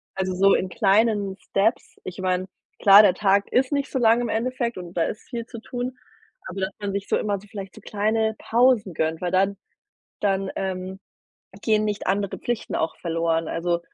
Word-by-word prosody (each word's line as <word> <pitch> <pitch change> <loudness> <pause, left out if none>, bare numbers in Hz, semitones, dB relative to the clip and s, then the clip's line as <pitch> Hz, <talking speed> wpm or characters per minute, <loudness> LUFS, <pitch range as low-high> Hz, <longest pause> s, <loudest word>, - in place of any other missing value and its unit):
also, 190 -1 -1
so 195 +2 +5
in 185 - -1
kleinen 205 0 +2
Steps. 210 +5 -1
Ich 185 +1 -7
meine, 185 0 0 0.3
klar, 200 +1 +9
der 195 - +5
Tag 200 0 +2
ist 255 +2 +2
nicht 280 -1 -1
so - - -1
lang 230 0 +4
im 240 - -2
Endeffekt, 235 +1 -1
und 175 -1 -8
da 170 - +1
ist 210 - -4
viel 235 -2 -4
zu 230 - -8
tun, 250 +2 -5 0.5
aber 190 +1 -6
dass 190 - 0
man 205 -1 -3
sich 200 0 -3
so - - +3
immer 205 -2 -1
so 210 - -17
vielleicht 200 -3 -8
so - - -12
kleine 220 +1 0
Pausen 235 -5 +2
gönnt, 160 +1 -1
weil 180 -1 -1
dann 195 +1 +2 0.6
dann, 195 -1 0
ähm, 190 0 -4 0.6
gehen 215 -1 +2
nicht 210 -1 -3
andere 200 0 -1
Pflichten 240 -2 -3
auch 160 - -1
verloren. 165 -1 -1
Also, 170 0 -1
200 Hz, 195 wpm, -24 LUFS, 185-225 Hz, 0.6 s, klar